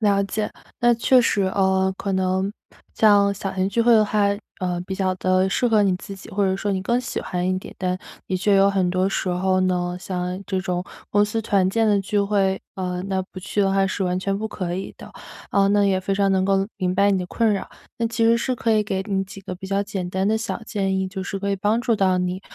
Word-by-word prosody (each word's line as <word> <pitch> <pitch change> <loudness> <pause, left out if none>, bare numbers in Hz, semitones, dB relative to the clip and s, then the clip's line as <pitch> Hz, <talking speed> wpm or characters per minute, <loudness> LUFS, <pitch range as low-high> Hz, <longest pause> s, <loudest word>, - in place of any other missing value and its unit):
了 200 -2 +3
解， 210 +1 -2 0.3
那 240 0 +5
确 250 +2 +4
实， 205 -4 +1
呃， 190 0 +2
可 195 - -3
能 190 +1 0 0.4
像 205 -2 +5
小 195 -1 -5
型 190 0 0
聚 230 +4 0
会 240 0 +5
的 215 -1 +6
话， 210 0 +1 0.4
呃， 180 -1 -1
比 190 - -3
较 190 -1 0
地 185 +1 +2
适 245 +5 +1
合 215 -2 +4
你 195 -2 +2
自 195 +1 -9
己， - - -13
或 200 +1 0
者 190 0 +1
说 205 0 -2
你 190 - -1
更 240 +4 +1
喜 250 0 -4
欢 180 0 -2
一 185 - +1
点， - - -11
但 185 0 -1 0.3
的 185 - -1
确 200 +2 +2
有 195 +1 +5
很 190 -2 +1
多 185 +1 +1
时 190 - -2
候 185 +1 +1
呢， 180 -1 0
像 180 0 -3
这 190 -2 -1
种 180 -1 -2 0.3
公 205 0 +4
司 225 +2 -2
团 195 -3 +2
建 225 +3 +1
的 205 -1 +3
聚 205 +1 0
会， 195 -1 +1 0.2
呃， 180 -1 -3
那 190 -1 0
不 185 0 -11
去 205 +2 -2
的 195 -1 +2
话 195 0 +3
是 190 0 -2
完 180 0 0
全 195 +1 -1
不 220 - -2
可 175 -4 -4
以 195 - -6
的。 - - -12 0.4
啊， 200 -1 +3
那 205 0 +3
也 190 -1 +2
非 195 +1 -1
常 195 0 +2
能 190 -1 +2
够 195 0 +2
明 185 -2 -1
白 200 +1 +4
你 195 - +2
的 180 - -4
困 225 +2 +1
扰， 195 - -3 0.3
那 230 - +1
其 230 0 0
实 230 +1 +5
是 255 +1 -1
可 230 -1 0
以 215 -1 +3
给 195 -2 -2
你 195 -1 0
几 195 0 -11
个 185 -1 -7
比 190 +1 -8
较 200 +1 0
简 190 -3 -4
单 190 +1 0
的 220 0 +2
小 230 0 -4
建 195 -4 -1
议， 190 0 -1
就 190 0 -5
是 195 - -4
可 200 - -1
以 195 - 0
帮 210 +4 +1
助 235 -2 +1
到 190 -2 +2
你， 180 +1 -2
195 Hz, 275 characters per minute, -22 LUFS, 185-205 Hz, 0.4 s, 的